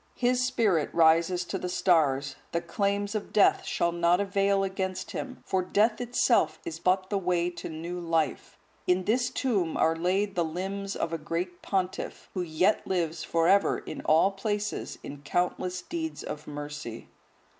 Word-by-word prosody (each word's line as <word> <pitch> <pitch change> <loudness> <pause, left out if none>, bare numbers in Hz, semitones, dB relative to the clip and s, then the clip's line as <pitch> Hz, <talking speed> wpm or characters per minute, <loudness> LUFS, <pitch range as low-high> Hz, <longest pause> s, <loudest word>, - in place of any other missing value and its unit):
His 250 0 +2
spirit 210 - +2
rises 170 +2 +4
to 190 +2 -3
the 180 - -3
stars; 145 -7 +2 0.2
the 170 - +2
claims 200 +4 -1
of 215 -2 -4
death 210 - +4
shall 170 - 0
not 170 +1 +3
avail 200 0 +2
against 190 -1 -3
him, 255 -1 -6
for 190 -1 +1
death 215 +5 +2
itself 240 -9 +2
is 165 -1 -5
but 185 +2 +1
the 200 - +1
way 175 -1 0
to 175 - -7
new 170 +3 -5
life. 165 -2 -1 0.3
In 180 +1 +3
this 240 +5 +1
tomb 210 - 0
are 160 0 +3
laid 190 +4 0
the 175 - +1
limbs 195 +4 -4
of 165 - -2
a 165 - -2
great 175 +3 -4
pontiff, 190 -2 -3
who 185 - -2
yet 180 +5 +1
lives 165 -3 -1
for 165 0 +1
ever 200 +2 +4
in - - -7
all 160 +5 +4
places 205 +1 -3
in 140 0 -8
countless 180 +4 -1
deeds 325 -2 -4
of 150 0 -6
mercy. 145 -5 -6
180 Hz, 165 wpm, -28 LUFS, 165-200 Hz, 0.3 s, rises